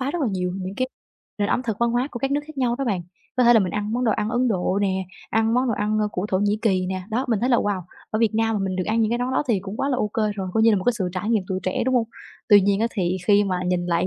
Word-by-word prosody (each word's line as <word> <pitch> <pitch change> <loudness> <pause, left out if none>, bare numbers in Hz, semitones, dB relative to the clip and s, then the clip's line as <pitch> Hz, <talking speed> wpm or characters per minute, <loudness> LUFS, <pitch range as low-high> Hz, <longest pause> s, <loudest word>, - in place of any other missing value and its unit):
phá 265 +1 -1
rất 340 +1 -2
là 260 - +1
nhiều 180 -2 -2
những 190 0 -5
cái 255 0 0 0.5
nền 205 0 0
ẩm 250 - +1
thực 225 -5 -3
văn 235 0 +2
hóa 245 +3 0
của 240 - -6
các 270 +2 -1
nước 285 +1 +1
khác 310 -2 -10
nhau 245 -2 +1
đó 275 - -1
bạn, 200 -8 -1 0.3
có 250 - +4
thể 240 - +7
là 225 - +6
mình 185 -3 -1
ăn 210 +1 -2
món 250 +2 0
đồ 225 - +3
ăn 210 - -1
Ấn 250 +2 +1
Độ 190 -2 0
nè, 190 -1 0 0.3
ăn 225 +1 +2
món 250 +1 +2
đồ 230 - +1
ăn, 210 +1 0
ơ, 210 -1 +1
của 180 +3 -2
Thổ 185 - +1
Nhĩ 205 +2 +1
Kỳ 190 -5 +2
nè, 185 0 -3
đó, 240 +4 0
mình 225 -4 +1
thấy 250 - +1
là, 245 - +4
wow, 205 -4 0 0.3
ở 215 - -1
Việt 225 -1 +2
Nam 225 0 +1
mà 210 - -1
mình 190 -1 -2
được 185 - -1
ăn 225 +2 +1
những 220 -1 +2
cái 240 - 0
món 250 +1 -1
đó 260 - +2
thì 215 -5 +2
cũng 195 +2 -7
quá 275 - -1
là 265 - +1
OK 210 -4 -2 0.2
rồi, 190 -2 -4
coi 220 - +3
như 225 - +6
là 210 - +3
một 185 - -3
cái 245 - +3
sự 185 -3 0
trải 195 +4 -2
nghiệm 220 -4 +2
tuổi 185 -1 -2
trẻ, 185 - -1
đúng 260 +1 +1
hông? 235 -3 +2 0.4
Tuy 205 -2 +8
nhiên 200 +1 +1
á, 230 - +3
thì 185 -4 -1
khi 205 -1 +5
mà 185 -2 -1
nhìn 180 -1 0
lại 175 +1 +1
215 Hz, 345 wpm, -23 LUFS, 190-240 Hz, 0.5 s, Tuy